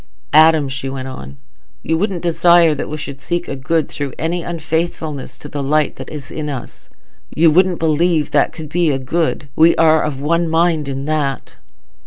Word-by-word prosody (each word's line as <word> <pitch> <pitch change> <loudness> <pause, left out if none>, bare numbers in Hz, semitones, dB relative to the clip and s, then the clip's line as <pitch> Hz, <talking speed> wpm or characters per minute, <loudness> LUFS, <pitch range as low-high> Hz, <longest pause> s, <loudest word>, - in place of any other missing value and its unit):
"Adam," 155 -1 +6
she 135 0 -5
went 135 -1 -5
on, 70 - -9 0.5
"you 160 - 0
wouldn't 185 0 -2
desire 170 -1 +4
that 145 - -5
we 155 - -4
should 140 -2 -8
seek 175 0 -3
a - - -4
good 150 +3 0
through 140 -4 -5
any 170 +2 -2
unfaithfulness 160 -3 -3
to - - -10
the 145 -1 -5
light 150 +1 0
that 130 - -8
is 145 -5 -9
in 150 -1 -4
us; 130 -5 -8 0.5
you 165 0 +5
wouldn't 180 +2 +3
believe 160 0 +1
that 145 - +2
could 155 -3 -9
be 170 +1 +1
a 140 - +1
good. 150 +3 -2
We 165 +2 +5
are 160 -1 +4
of 145 -3 -3
one 165 +3 0
mind 165 -2 +1
in 135 0 -4
that." 145 -4 -2
155 Hz, 190 wpm, -18 LUFS, 140-165 Hz, 0.5 s, Adam